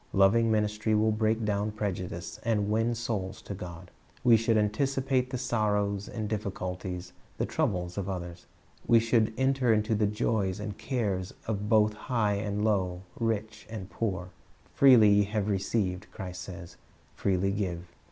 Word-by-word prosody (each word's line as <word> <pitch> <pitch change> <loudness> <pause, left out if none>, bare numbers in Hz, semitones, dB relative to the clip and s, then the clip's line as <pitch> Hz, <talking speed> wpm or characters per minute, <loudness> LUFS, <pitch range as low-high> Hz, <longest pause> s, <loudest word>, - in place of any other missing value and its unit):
Loving 105 +4 +4
ministry 110 0 +1
will 110 +1 +3
break 110 +1 +1
down 105 0 0
prejudice, 90 -5 -4
and 105 -3 0
win 115 +2 +1
souls 105 -5 -3
to - - -6
God. 90 -1 -9 0.3
We 120 -2 +7
should 115 0 +2
anticipate 130 +4 +1
the 130 - -3
sorrows, 105 -4 0
the 110 - -5
difficulties, 95 -4 -4 0.2
the - - 0
troubles 90 0 -1
of 100 0 -3
others. 90 -2 -6 0.4
We 115 - +6
should 115 -1 +2
enter 130 -2 +2
into 110 +1 +2
the 105 -1 +2
joys 105 -2 0
and 105 -1 -5
cares 105 -5 -2
of 105 -1 -2
both 110 -1 +4
high 110 -2 0
and 105 +1 -1
low, 95 -4 0 0.2
rich 110 -1 -2
and 105 -3 -7
poor. 95 -5 -3 0.4
"Freely 125 -6 +7
ye 100 0 +5
have 105 0 -2
received," 95 -2 -1
Christ 90 -2 -7
says, 90 -1 -9 0.4
"freely 95 0 +1
give.'" 90 -4 -3
105 Hz, 150 wpm, -29 LUFS, 95-110 Hz, 0.4 s, We